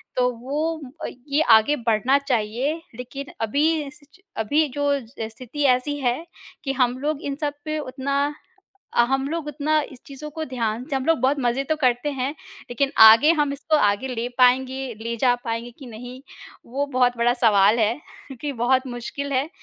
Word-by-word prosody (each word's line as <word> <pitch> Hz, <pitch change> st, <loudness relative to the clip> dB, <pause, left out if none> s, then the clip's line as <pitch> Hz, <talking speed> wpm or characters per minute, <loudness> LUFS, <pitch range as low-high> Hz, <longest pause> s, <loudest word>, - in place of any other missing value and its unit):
तो 250 Hz, 0 st, +2 dB
वो 305 Hz, +5 st, -2 dB, 0.2 s
अ, -, -, -2 dB, 0.2 s
ये 285 Hz, +2 st, +2 dB, 0.2 s
आगे 255 Hz, +7 st, +1 dB
बढ़ना 235 Hz, +1 st, +2 dB
चाहिए 265 Hz, +3 st, -1 dB
लेकिन 275 Hz, +4 st, -7 dB
अभी 280 Hz, +8 st, +2 dB, 0.2 s
इस 290 Hz, +1 st, -11 dB
च -, -, -20 dB, 0.2 s
अभी 290 Hz, +8 st, +2 dB
जो 285 Hz, +2 st, -3 dB, 0.2 s
जैस 225 Hz, -2 st, -8 dB
स्थिति 255 Hz, +5 st, -7 dB
ऐसी 255 Hz, +3 st, +2 dB
है 250 Hz, -3 st, +2 dB, 0.5 s
कि 270 Hz, -, -1 dB
हम 250 Hz, -1 st, +1 dB
लोग 295 Hz, +1 st, -2 dB
इन 280 Hz, -1 st, -2 dB
सब 290 Hz, -1 st, -1 dB
पे 310 Hz, 0 st, -2 dB
उतना 270 Hz, 0 st, -3 dB, 0.8 s
अ, -, -, +4 dB
हम 270 Hz, +1 st, 0 dB
लोग 325 Hz, 0 st, -3 dB
उतना 300 Hz, +1 st, +1 dB
इस 255 Hz, -, -13 dB
चीज़ों 280 Hz, +2 st, -8 dB
को 315 Hz, +1 st, -5 dB
ध्यान 235 Hz, -3 st, -3 dB
से 275 Hz, -, 0 dB
हम 265 Hz, -, -2 dB
लोग 325 Hz, -2 st, +3 dB
बहुत 265 Hz, +3 st, +2 dB
मज़े 245 Hz, +2 st, +1 dB
तो 315 Hz, -, +2 dB
करते 255 Hz, -1 st, +1 dB
हैं, 270 Hz, -1 st, -2 dB, 0.4 s
लेकिन 275 Hz, +3 st, 0 dB
आगे 230 Hz, +8 st, +8 dB
हम 290 Hz, -1 st, +1 dB
इसको 310 Hz, +3 st, 0 dB
आगे 205 Hz, 0 st, +1 dB
ले 240 Hz, -1 st, -3 dB
पाएँगे 260 Hz, 0 st, +2 dB
ले 230 Hz, +1 st, -3 dB
जा 250 Hz, -2 st, +4 dB
पाएँगे 230 Hz, +1 st, -3 dB
कि 270 Hz, -, -10 dB
नहीं 245 Hz, +2 st, -9 dB, 0.5 s
वो 280 Hz, +2 st, 0 dB
बहुत 250 Hz, -3 st, +2 dB
बड़ा 235 Hz, +1 st, +3 dB
सवाल 215 Hz, -3 st, +4 dB
है, 220 Hz, 0 st, +2 dB, 0.3 s
क्योंकि 280 Hz, +2 st, -5 dB
बहुत 260 Hz, +2 st, +2 dB
मुश्किल 255 Hz, +3 st, -5 dB
है। 270 Hz, +3 st, 0 dB
260 Hz, 185 wpm, -23 LUFS, 240-285 Hz, 0.8 s, आगे